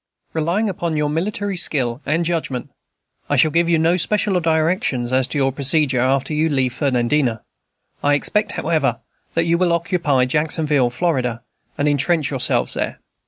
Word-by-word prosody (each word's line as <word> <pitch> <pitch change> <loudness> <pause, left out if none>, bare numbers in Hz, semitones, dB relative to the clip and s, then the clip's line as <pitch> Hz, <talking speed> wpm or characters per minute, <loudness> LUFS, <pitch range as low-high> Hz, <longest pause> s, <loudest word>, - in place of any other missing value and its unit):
Relying 170 +7 0
upon 170 -4 -3
your 150 -1 0
military 200 +4 -2
skill 130 -7 0
and 165 +3 0
judgment. 150 -6 -3 0.6
I - - +1
shall 155 - +4
give 170 +2 +1
you 170 - +3
no 165 +3 +2
special 200 0 +1
directions 160 - 0
as 130 -1 +3
to 145 - -4
your 135 -1 +1
procedure 140 0 +2
after 135 +3 0
you 155 +2 +1
leave 130 -4 0
Fernandina. 125 -2 0 0.6
I 145 0 +3
expect, 210 +8 0
however, 155 -4 0 0.4
that 165 0 +1
you 170 0 +1
will 180 -2 +2
occupy 165 -6 +1
Jacksonville, 150 -1 +1
Florida, 125 -4 -2 0.3
and 145 - 0
intrench 145 0 +1
yourselves - - +1
there. - - -3
150 Hz, 160 wpm, -19 LUFS, 135-170 Hz, 0.6 s, shall